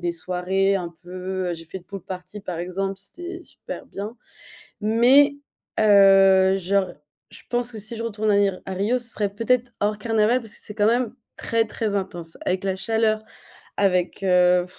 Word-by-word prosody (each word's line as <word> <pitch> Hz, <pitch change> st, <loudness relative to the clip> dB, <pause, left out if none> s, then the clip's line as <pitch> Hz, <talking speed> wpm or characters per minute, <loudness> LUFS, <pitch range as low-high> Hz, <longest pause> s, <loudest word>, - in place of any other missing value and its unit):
ait 175 Hz, -, -2 dB
des -, -, 0 dB
soirées 185 Hz, +3 st, 0 dB
un 175 Hz, -3 st, -5 dB
peu 185 Hz, 0 st, -4 dB
j'ai 165 Hz, -, -10 dB
fait 190 Hz, -, -7 dB
une 175 Hz, -, -21 dB
pool 195 Hz, -1 st, -8 dB
party 185 Hz, +2 st, -8 dB
par 180 Hz, -4 st, -5 dB
exemple, 190 Hz, +2 st, -3 dB
c'était 350 Hz, -, -8 dB
super -, -, -9 dB
bien 210 Hz, +4 st, -7 dB, 0.6 s
mais, 255 Hz, +7 st, +5 dB, 0.4 s
heu, 195 Hz, -2 st, +6 dB
genre, 190 Hz, 0 st, 0 dB, 0.4 s
je -, -, -12 dB
pense 245 Hz, 0 st, -1 dB
que 220 Hz, -, -7 dB
si 215 Hz, +3 st, -6 dB
je 230 Hz, -, -4 dB
retourne 215 Hz, -1 st, -1 dB
à 200 Hz, -, +4 dB
ir 195 Hz, -2 st, +1 dB
à 190 Hz, -, -4 dB
Rio. 215 Hz, +7 st, +1 dB
Ce 235 Hz, -1 st, -5 dB
serait 205 Hz, -2 st, -1 dB
peut-être 240 Hz, +2 st, +1 dB
hors 210 Hz, +1 st, 0 dB
carnaval 225 Hz, +2 st, +2 dB
parce 225 Hz, -3 st, -10 dB
que -, -, -8 dB
c'est 210 Hz, -, -6 dB
quand 210 Hz, -1 st, +2 dB
même 240 Hz, +1 st, +1 dB, 0.2 s
très, 225 Hz, -1 st, 0 dB
très 215 Hz, -1 st, -3 dB
intense. 175 Hz, -4 st, -4 dB
Avec 185 Hz, +1 st, 0 dB
la 190 Hz, -1 st, 0 dB
chaleur, 215 Hz, +2 st, +1 dB, 0.6 s
avec, 185 Hz, -1 st, +1 dB
heu, 180 Hz, -1 st, +4 dB
200 Hz, 185 wpm, -23 LUFS, 185-225 Hz, 0.6 s, heu